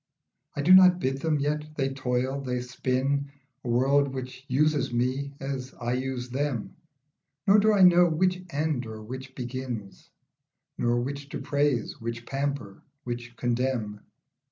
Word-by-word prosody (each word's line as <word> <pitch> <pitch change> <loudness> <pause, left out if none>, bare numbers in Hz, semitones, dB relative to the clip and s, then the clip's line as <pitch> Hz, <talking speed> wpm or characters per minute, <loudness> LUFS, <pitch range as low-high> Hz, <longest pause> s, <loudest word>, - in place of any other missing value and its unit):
I 145 - -2
do 180 +5 +7
not 185 -1 +8
bid 135 -3 -1
them, 160 -2 +1
yet 150 +1 -2
they 135 -2 -1
toil, 130 +1 -1
they 125 -2 -2
spin; 130 +3 -1 0.3
A - - -7
world 135 +4 +3
which 130 -1 -7
uses 145 0 +2
me 130 +4 -1
as 135 -1 -5
I 120 +1 -1
use 130 -1 -3
them, 130 -3 -2 0.7
Nor 200 +2 +6
do 215 +1 +4
I 200 -3 +5
know 175 -1 +7
which 180 +3 +1
end 150 -5 -1
or 110 -1 -8
which 130 +4 -8
begin, 125 -5 -5 0.9
Nor 120 0 +2
which 140 +2 -5
to - - -4
praise, 140 -7 0
which 115 +1 -5
pamper, 135 -7 -3 0.2
which 120 0 -6
condemn. 120 -4 -1
135 Hz, 150 wpm, -27 LUFS, 125-145 Hz, 0.9 s, not